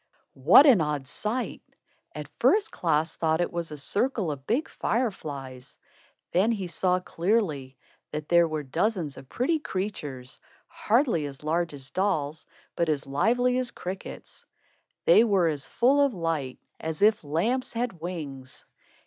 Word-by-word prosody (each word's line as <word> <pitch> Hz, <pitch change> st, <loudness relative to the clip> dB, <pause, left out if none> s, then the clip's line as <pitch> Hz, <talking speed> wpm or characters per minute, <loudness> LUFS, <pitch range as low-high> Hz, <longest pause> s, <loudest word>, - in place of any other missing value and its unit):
What 265 Hz, -, +10 dB
an 245 Hz, -, +6 dB
odd 150 Hz, -3 st, -2 dB
sight! 220 Hz, -, -3 dB, 0.5 s
At -, -, -6 dB
first 425 Hz, 0 st, +3 dB
Klaas 160 Hz, -1 st, 0 dB
thought 160 Hz, 0 st, +1 dB
it 175 Hz, -, -1 dB
was 170 Hz, -1 st, -3 dB
a 150 Hz, -, -7 dB
circle 205 Hz, -, 0 dB
of 140 Hz, -2 st, -8 dB
big 265 Hz, +8 st, +1 dB
fire 235 Hz, +1 st, 0 dB
flies. 135 Hz, -7 st, -8 dB, 0.5 s
Then 200 Hz, +6 st, +3 dB
he 200 Hz, -5 st, -2 dB
saw 180 Hz, +1 st, +1 dB
clearly 170 Hz, -, -1 dB, 0.3 s
that 150 Hz, 0 st, -5 dB
there 170 Hz, -1 st, +5 dB
were 155 Hz, -2 st, -3 dB
dozens 165 Hz, -, -1 dB
of 130 Hz, -, -13 dB
pretty 310 Hz, +6 st, 0 dB
creatures, 165 Hz, -, -5 dB, 0.2 s
hardly 225 Hz, -, +1 dB
as 140 Hz, 0 st, -10 dB
large 165 Hz, 0 st, -1 dB
as 135 Hz, -1 st, -10 dB
dolls, 160 Hz, -6 st, -1 dB, 0.3 s
but 170 Hz, -1 st, 0 dB
as 145 Hz, -3 st, -1 dB
lively 240 Hz, -, +2 dB
as 255 Hz, -1 st, -1 dB
crickets. 185 Hz, -2 st, -8 dB, 0.6 s
They -, -, +7 dB
were 195 Hz, -7 st, +3 dB
as 145 Hz, -4 st, -2 dB
full 265 Hz, -, +3 dB
of 275 Hz, -6 st, +1 dB
light, 160 Hz, -7 st, -2 dB, 0.2 s
as 160 Hz, +4 st, -3 dB
if 215 Hz, -3 st, +4 dB
lamps 195 Hz, -, -1 dB
had 230 Hz, -8 st, -3 dB
wings. 145 Hz, -7 st, -7 dB
170 Hz, 150 wpm, -27 LUFS, 150-220 Hz, 0.6 s, What